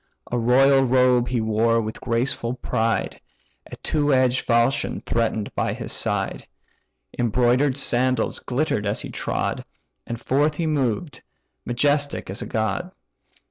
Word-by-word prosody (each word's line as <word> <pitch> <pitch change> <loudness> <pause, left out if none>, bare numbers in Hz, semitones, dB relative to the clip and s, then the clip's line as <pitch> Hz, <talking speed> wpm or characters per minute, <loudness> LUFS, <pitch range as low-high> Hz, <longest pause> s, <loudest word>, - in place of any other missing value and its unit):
A 120 - 0
royal 135 +4 +5
robe 125 -1 +3
he 125 -2 0
wore 110 +1 +2
with 110 -1 -5
graceful 120 0 -1
pride, 115 -2 -1 0.5
A - - -6
two 145 -2 0
edged 130 -1 +2
falchion 120 +3 +1
threaten'd 110 -2 -1
by - - -1
his - - -5
side, - - -2 0.7
Embroider'd 125 +4 +2
sandals 130 -1 +1
glitter'd 125 -5 -1
as 100 - -2
he - - -7
trod, - - -2 0.4
And 120 -1 -4
forth 145 +5 +1
he 165 - -2
moved, 145 -1 -1 0.5
majestic 145 -1 0
as 100 - -7
a - - -5
god. 115 +12 -2
125 Hz, 135 wpm, -23 LUFS, 115-135 Hz, 0.7 s, royal